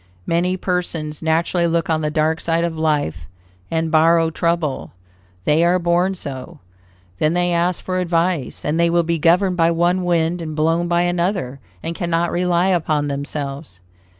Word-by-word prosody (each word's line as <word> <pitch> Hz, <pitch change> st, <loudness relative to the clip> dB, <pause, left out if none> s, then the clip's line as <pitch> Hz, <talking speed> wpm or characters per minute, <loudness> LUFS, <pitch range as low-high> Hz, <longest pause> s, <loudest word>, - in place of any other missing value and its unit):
Many 180 Hz, +2 st, 0 dB
persons 170 Hz, -5 st, -3 dB
naturally 165 Hz, +2 st, +1 dB
look 165 Hz, 0 st, 0 dB
on 160 Hz, -1 st, 0 dB
the 150 Hz, -, 0 dB
dark 155 Hz, +1 st, 0 dB
side 165 Hz, 0 st, 0 dB
of 170 Hz, -1 st, -2 dB
life, 145 Hz, -, -1 dB, 0.4 s
and 160 Hz, -1 st, -1 dB
borrow 165 Hz, +1 st, +4 dB
trouble. 170 Hz, -3 st, -1 dB, 0.5 s
They 155 Hz, +3 st, +3 dB
are 175 Hz, +1 st, +3 dB
born 175 Hz, +2 st, +1 dB
so. 130 Hz, -7 st, -8 dB, 0.6 s
Then 155 Hz, +1 st, +2 dB
they 175 Hz, 0 st, +1 dB
ask 175 Hz, +1 st, 0 dB
for 185 Hz, 0 st, -1 dB
advice, 170 Hz, -3 st, -1 dB
and 150 Hz, +3 st, 0 dB
they 170 Hz, 0 st, +3 dB
will 170 Hz, 0 st, +2 dB
be 165 Hz, 0 st, -1 dB
governed 180 Hz, +3 st, +3 dB
by 165 Hz, -1 st, +4 dB
one 175 Hz, +2 st, +1 dB
wind 170 Hz, 0 st, 0 dB
and 155 Hz, -2 st, -5 dB
blown 165 Hz, +3 st, +1 dB
by 170 Hz, 0 st, +2 dB
another, 175 Hz, -6 st, -1 dB, 0.2 s
and 165 Hz, -, -3 dB
cannot 170 Hz, 0 st, -1 dB
rely 180 Hz, +1 st, +1 dB
upon 155 Hz, -5 st, 0 dB
themselves. 140 Hz, -, -5 dB
170 Hz, 165 wpm, -20 LUFS, 155-175 Hz, 0.6 s, borrow